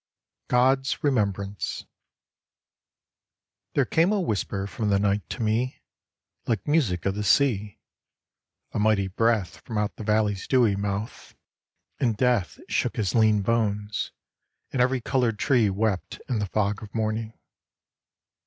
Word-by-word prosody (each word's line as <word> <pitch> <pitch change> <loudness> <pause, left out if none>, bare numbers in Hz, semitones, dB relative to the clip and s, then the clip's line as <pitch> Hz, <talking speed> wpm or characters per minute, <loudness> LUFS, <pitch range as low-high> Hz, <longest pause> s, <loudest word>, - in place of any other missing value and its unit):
GOD'S 130 +2 +2
REMEMBRANCE 100 -7 -1 1.9
There - - +3
came 165 +4 +2
a 210 - +2
whisper 100 - -2
from 105 +1 -3
the 100 - +4
night 100 +1 +1
to - - -3
me 115 +4 -1 0.6
Like 115 +1 -1
music 125 - +1
of 100 - +1
the 105 +1 -3
sea, 105 -5 +2 0.9
a - - -2
mighty 105 -2 +3
breath 105 -1 0
From 115 - -6
out 105 0 -1
the - - -6
valley's 105 -2 +1
dewy 120 -6 +3
mouth, 100 +2 -4 0.6
and 115 -5 +1
Death 120 -7 +1
Shook - - 0
his 100 -5 -1
lean 110 -3 +4
bones, 105 -2 -1 0.6
and 130 - 0
every 130 0 +2
coloured 120 -4 0
tree 120 -3 +3
Wept 100 -1 -1
in 120 -4 -1
the 105 - -1
fog 100 +1 0
of 105 0 -11
morning. 110 0 -2
110 Hz, 135 wpm, -26 LUFS, 100-120 Hz, 1.9 s, the